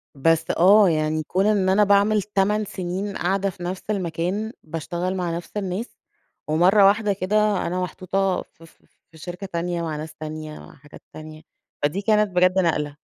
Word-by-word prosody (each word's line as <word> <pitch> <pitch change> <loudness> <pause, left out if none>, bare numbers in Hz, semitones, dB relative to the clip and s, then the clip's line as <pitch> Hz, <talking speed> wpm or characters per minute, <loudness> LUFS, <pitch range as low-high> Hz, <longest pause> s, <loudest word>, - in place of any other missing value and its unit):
بس 165 +3 +2
آه، 195 +2 +6
يعني 155 0 0
كون 190 +5 0
إن 200 -3 +2
أنا 205 +2 +4
باعمل 205 +1 +3
8 210 +1 0
سنين 190 +2 -4
قاعدة 195 +2 0
في 175 -1 -10
نفس 185 +1 -4
المكان، 185 +3 -2
باشتغل 170 +4 -4
مع 175 -2 -2
نفس 175 - -9
الناس، 195 +4 -4 0.5
ومرة 180 +6 +4
واحدة 205 0 +2
كده 205 +1 +1
أنا 180 +1 -2
محطوطة 185 +1 -1
ف 165 - -18
ف 165 - -19 0.3
في 160 - -16
شركة 180 +4 -7
تانية، 175 -1 -3
مع 160 -2 -3
ناس 155 +1 -8
تانية، 155 0 -7
مع - - -14
حاجات 145 +1 -16
تانية، 155 0 -10 0.4
فدي 155 +8 0
كانت 210 -1 +2
بجد 185 +1 +3
نقلة. 150 -4 0
185 Hz, 170 wpm, -23 LUFS, 165-200 Hz, 0.5 s, آه